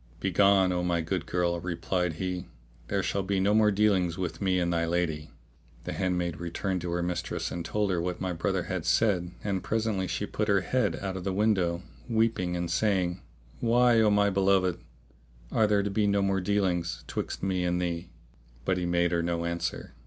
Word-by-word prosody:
"Begone, 95 0 +4
O 90 -1 0
my 85 -1 +1
good 80 - -3
girl," 85 -1 0
replied 90 0 -1
he, 90 +2 -4 0.4
"there - - 0
shall 100 - 0
be 95 0 -1
no 100 +2 +3
more 110 0 +5
dealings 100 -4 +2
between 90 0 -4
me 95 -1 +2
and 85 0 0
thy 85 0 +1
lady." 80 -3 -1 0.5
The - - -4
handmaid 90 -3 -1
returned 90 +2 -2
to 90 - -4
her 90 0 0
mistress 85 0 -3
and 85 - -4
told 105 +3 0
her 85 -2 0
what 90 0 -3
my 95 -1 -2
brother 80 - -1
had - - -3
said 95 -6 +2
and 100 -3 -1
presently 110 -4 -1
she - - -2
put 105 - -2
her 100 -2 +3
head 105 -4 0
out 95 -1 -3
of 90 - -6
the 95 - -1
window, 95 -4 +1 0.3
weeping 110 -6 +1
and 85 -1 -2
saying, 95 -3 +1 0.4
"Why, 120 0 +4
O 110 - +4
my 100 0 +3
beloved, 95 -2 +2 0.7
are 110 - +3
there 105 -1 +2
to 100 - -2
be 105 +1 +1
no 100 0 +2
more 95 -1 +1
dealings 90 -4 0
'twixt - - -4
me 95 -2 0
and 90 0 0
thee?" 85 0 -3 0.6
But 95 +3 +1
he 90 - -1
made 85 0 +2
her 85 -1 +1
no 85 0 -1
answer. 85 0 -3
90 Hz, 195 wpm, -28 LUFS, 85-100 Hz, 0.7 s, more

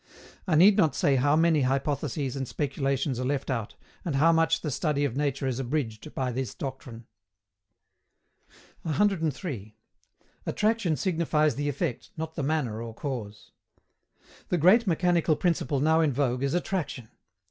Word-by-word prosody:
I 165 - +2
need 195 +6 +7
not 160 -10 +3
say 140 - +2
how 145 +3 +3
many 160 -1 +3
hypotheses 135 0 -1
and 135 -2 -3
speculations 135 -2 -1
are - - -2
left 135 +1 -1
out, 115 -5 -3 0.3
and 160 -5 -2
how 160 +5 +5
much 165 -2 +2
the 150 - -3
study 145 +1 0
of 130 -4 -3
nature 140 -1 -1
is 130 -1 -1
abridged 130 -1 -3
by 130 -1 -1
this 125 -2 -4
doctrine. 130 -4 -7 1.8
103. 160 - -1 0.7
ATTRACTION 210 -7 +1
SIGNIFIES 160 -5 +1
THE 145 +1 -2
EFFECT, 135 -3 -3
NOT 160 0 -4
THE 160 - -4
MANNER 135 -7 -1
OR 115 -1 -7
CAUSE. 115 -7 -6 1.0
The 180 - +1
great 195 +8 +5
mechanical 175 -2 +2
principle 150 -5 0
now 160 +3 +3
in 155 -3 +2
vogue 125 -2 0
is 140 +3 0
attraction. 170 - -3
145 Hz, 145 wpm, -27 LUFS, 130-160 Hz, 1.8 s, need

